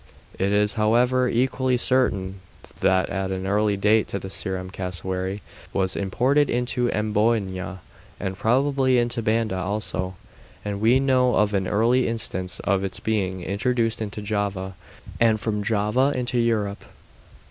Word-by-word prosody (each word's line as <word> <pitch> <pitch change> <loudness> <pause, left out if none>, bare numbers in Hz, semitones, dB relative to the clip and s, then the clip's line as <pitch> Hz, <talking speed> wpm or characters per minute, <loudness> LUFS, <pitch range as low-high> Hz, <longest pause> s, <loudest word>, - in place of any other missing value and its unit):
It 95 +1 +1
is, 105 0 +2
however, 125 +3 +3
equally 130 +1 +1
certain 100 -7 +1 0.4
that 95 -1 +3
at 95 -1 -2
an 95 0 -3
early 105 +1 +1
date 105 +2 +3
the 100 - -3
Ceram 95 -1 -3
cassowary 95 +1 -4 0.3
was 95 -1 0
imported 130 +9 +1
into 125 0 0
Amboyna 105 -3 0 0.4
and 95 0 -3
probably 130 +4 +2
into 120 -1 0
Banda 110 -3 0
also, 95 -1 -3 0.5
and 100 -1 -3
we 120 +4 +5
know 130 -2 +3
of 105 0 +2
an 95 -2 0
early 120 +5 +2
instance 95 -5 -3
of 95 0 +1
its 95 -2 -4
being 95 -4 -1
introduced 115 +3 0
into 105 -1 -5
Java, 100 -2 -2 0.5
and 115 -2 +3
from 105 -1 -2
Java 110 +6 +1
into 125 -1 -1
Europe. 105 -4 0
105 Hz, 135 wpm, -24 LUFS, 95-120 Hz, 0.5 s, we